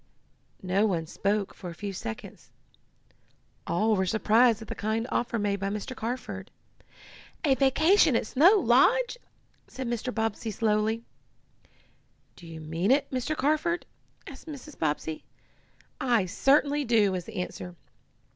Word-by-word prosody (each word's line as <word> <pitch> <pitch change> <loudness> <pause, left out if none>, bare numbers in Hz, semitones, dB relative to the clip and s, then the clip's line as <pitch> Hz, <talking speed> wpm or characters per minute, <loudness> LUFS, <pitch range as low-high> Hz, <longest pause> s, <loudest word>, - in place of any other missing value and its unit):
No 190 +4 +2
one 170 -5 -1
spoke 200 +4 -1
for 180 - -8
a 170 - -9
few 200 +1 -5
seconds. 110 -11 -8 1.2
All 215 +5 +2
were 190 -1 0
surprised 220 +3 +3
at 220 - -10
the - - -4
kind 220 +2 -2
offer 240 -1 -1
made 205 -1 -1
by 195 +1 -2
Mr. 210 +5 -5
Carford. 245 +3 -5 1.0
"A 275 - +4
vacation 300 - +4
at 230 - +1
Snow 330 - +5
Lodge!" 465 - +3 0.5
said 260 -1 -6
Mr. 240 +1 -2
Bobbsey 225 -1 -2
slowly. 215 +1 0 1.3
"Do 175 - -13
you 165 -1 -9
mean 165 +5 -2
it, 275 +3 +2
Mr. 260 +4 -2
Carford?" 310 +5 0 0.4
asked - - -11
Mrs. 300 -1 -9
Bobbsey. 155 0 -2 0.8
"I 235 -7 +2
certainly 285 - +2
do," 225 -5 +3
was 180 -2 -3
the - - -10
answer. 180 -1 -5
225 Hz, 135 wpm, -27 LUFS, 195-265 Hz, 1.3 s, Snow